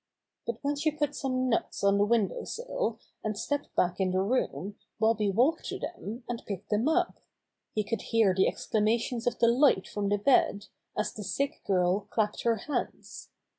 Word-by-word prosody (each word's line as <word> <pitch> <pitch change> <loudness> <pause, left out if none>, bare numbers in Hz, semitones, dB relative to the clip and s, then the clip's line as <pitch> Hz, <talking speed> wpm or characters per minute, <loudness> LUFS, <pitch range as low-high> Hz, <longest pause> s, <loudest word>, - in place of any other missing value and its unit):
But 235 -1 -2
when 285 +1 +1
she 310 +2 +2
put 295 -1 -1
some 255 -2 -1
nuts 230 -4 -1
on 200 0 +4
the 205 - +5
window 220 -2 +1
sill, 460 - -3 0.3
and 215 -1 -2
stepped 285 +6 -3
back 180 +1 +1
in 190 -1 +2
the 185 +1 +1
room 205 -3 -1 0.2
Bobby 220 -2 +3
walked 255 - +2
to - - -3
them, 240 - -6
and 240 -1 -4
picked 200 0 -6
them 215 +6 +2
up. 355 +2 +1 0.6
He 215 - +2
could 220 0 -2
hear 225 -4 +3
the 190 +1 +3
exclamations 230 +2 0
of 240 - +1
delight 235 -3 +4
from 205 -1 -2
the 205 - +2
bed, 205 -2 +3 0.3
as 210 0 -1
the 210 - -7
sick 280 +8 -2
girl 185 +1 +2
clapped 210 -1 0
her 235 -1 +2
hands. 290 +7 -5
220 Hz, 180 wpm, -29 LUFS, 205-255 Hz, 0.6 s, the